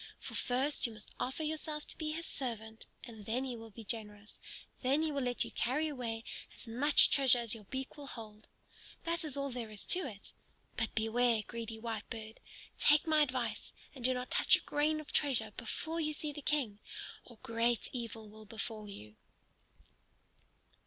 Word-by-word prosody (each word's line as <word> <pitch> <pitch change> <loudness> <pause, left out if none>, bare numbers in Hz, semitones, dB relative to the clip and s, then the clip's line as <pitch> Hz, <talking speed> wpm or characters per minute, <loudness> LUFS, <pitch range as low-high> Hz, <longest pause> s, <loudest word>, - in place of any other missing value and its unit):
For - - -7
first 260 +2 +2
you 230 - -8
must 215 -1 -12
offer 265 +5 -1
yourself 305 -1 -2
to - - -2
be 310 -1 -2
his 330 +2 -3
servant, 220 -4 -5 0.2
and 220 -4 -9
then 240 +4 +1
he 255 -2 -3
will 225 -1 -9
be 225 +2 -10
generous; 210 -2 -5 0.4
then 275 +4 +3
he 315 - +1
will 280 -1 -1
let 245 -1 +1
you - - -8
carry 290 +6 +1
away 235 -6 -3 0.3
as - - -10
much 260 +6 +6
treasure 265 -3 +6
as 235 -2 0
your 220 -3 -8
beak 265 +6 -5
will 285 -1 -8
hold. 215 -4 -8 0.6
That 335 0 0
is 295 -3 -3
all 280 0 -1
there 240 -3 -4
is 210 -1 -4
to 365 - +4
it. 200 -5 -9 0.4
But 225 - -1
beware, 225 0 +3
greedy 230 -1 -5
Whitebird! 220 -1 -5 0.4
Take 295 +2 +7
my 310 -1 +5
advice, 250 -6 0 0.2
and 260 -3 -10
do 255 +1 +4
not 250 0 -4
touch - - +7
a - - -2
grain 305 +1 +1
of 305 - -7
treasure 240 -7 +3
before 315 +7 -3
you 305 -1 0
see 300 0 -1
the 295 - -7
King, 260 -8 +1 0.4
or 240 - -14
great 230 0 +1
evil 230 -3 -5
will 215 +1 -12
befall 215 0 -4
you." 105 - -10
240 Hz, 185 wpm, -34 LUFS, 220-285 Hz, 0.6 s, Take